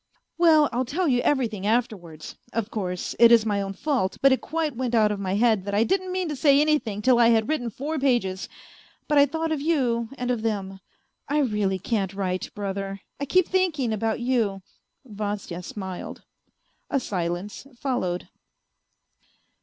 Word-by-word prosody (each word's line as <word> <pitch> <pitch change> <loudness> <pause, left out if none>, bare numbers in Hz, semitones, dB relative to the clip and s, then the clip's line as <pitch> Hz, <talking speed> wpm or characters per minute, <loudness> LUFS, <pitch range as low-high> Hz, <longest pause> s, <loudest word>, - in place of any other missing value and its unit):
" - - -55
Well, 315 -3 +6
I'll 250 +1 0
tell 320 +8 -1
you 245 -3 +2
everything 225 -9 0
afterwards. 205 -9 -2 0.2
Of 230 -1 -2
course, 180 -4 -3
it 235 0 +8
is 230 -2 +6
my 205 -2 0
own 195 0 -4
fault, 250 -5 -1
but 275 - +5
it 260 - +2
quite 315 -3 -2
went 245 -1 -1
out 215 -2 +4
of 205 - -3
my 190 -1 -1
head 220 -2 +3
that 200 0 -2
I 210 - +4
didn't 375 +6 0
mean 370 -1 -1
to 300 - -3
say 280 +1 +4
anything 290 -9 +1
till 255 -2 +4
I 235 - +6
had 225 -1 +3
written 250 -7 -1
four 290 +7 -4
pages, 235 -9 0 0.6
but 295 -2 +4
I 285 - +6
thought 320 +3 -2
of 305 -3 -1
you 250 -8 0
and 250 0 -1
of 240 -3 -1
them. 195 -4 -3 0.5
I 290 - +1
really 210 -7 0
can't 195 -1 -2
write, 185 -2 -2
brother, 195 -1 -4 0.2
I 280 - -2
keep 365 +5 +3
thinking 320 -11 0
about 220 +1 -1
you. 230 -6 0 0.2
..." - - -50
Vasya 205 -5 -5
smiled. 190 0 -7 0.7
A 275 - +1
silence 185 +2 -4
followed. 235 -10 -2
230 Hz, 180 wpm, -25 LUFS, 200-280 Hz, 0.7 s, it